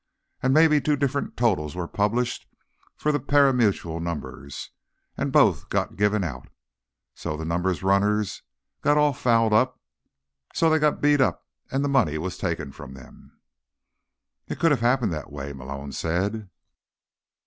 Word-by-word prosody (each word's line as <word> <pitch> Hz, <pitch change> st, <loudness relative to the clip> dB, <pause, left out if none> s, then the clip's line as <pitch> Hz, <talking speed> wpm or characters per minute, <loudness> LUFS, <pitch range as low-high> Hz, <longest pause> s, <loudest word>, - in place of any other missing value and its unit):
And 130 Hz, -, +2 dB
maybe 155 Hz, 0 st, +5 dB
two 150 Hz, +1 st, +1 dB
different 140 Hz, 0 st, -2 dB
totals 90 Hz, -11 st, 0 dB
were 90 Hz, -2 st, -3 dB
published 110 Hz, +6 st, -1 dB, 0.5 s
for 150 Hz, -, 0 dB
the 145 Hz, -, 0 dB
pari 140 Hz, -1 st, +4 dB
mutuel 100 Hz, -9 st, 0 dB
numbers, 75 Hz, -4 st, -6 dB, 0.4 s
and -, -, -2 dB
both -, -, +3 dB
got -, -, -1 dB
given 105 Hz, 0 st, +1 dB
out. 65 Hz, -7 st, -6 dB, 0.6 s
So 75 Hz, -, -5 dB
the 80 Hz, -, -5 dB
numbers 90 Hz, +2 st, -1 dB
runners 100 Hz, +1 st, +1 dB, 0.4 s
got 145 Hz, +1 st, +3 dB
all 150 Hz, -1 st, +3 dB
fouled 115 Hz, -3 st, +2 dB
up, 125 Hz, +4 st, +2 dB, 0.8 s
so 165 Hz, -1 st, +3 dB
they 160 Hz, -, +3 dB
got 150 Hz, -1 st, +1 dB
beat 145 Hz, -1 st, +4 dB
up 130 Hz, -, 0 dB, 0.2 s
and 140 Hz, +2 st, 0 dB
money 125 Hz, -, +2 dB
taken 85 Hz, -6 st, -3 dB
from 65 Hz, 0 st, -11 dB
them." 65 Hz, -1 st, -16 dB, 1.1 s
"It -, -, -5 dB
could 165 Hz, -, +4 dB
have 135 Hz, -6 st, +1 dB
happened 120 Hz, -5 st, +2 dB
that 75 Hz, -2 st, -6 dB
way," 70 Hz, 0 st, -6 dB
Malone 70 Hz, +1 st, -7 dB
said. 95 Hz, +8 st, -2 dB
105 Hz, 150 wpm, -25 LUFS, 85-135 Hz, 1.1 s, maybe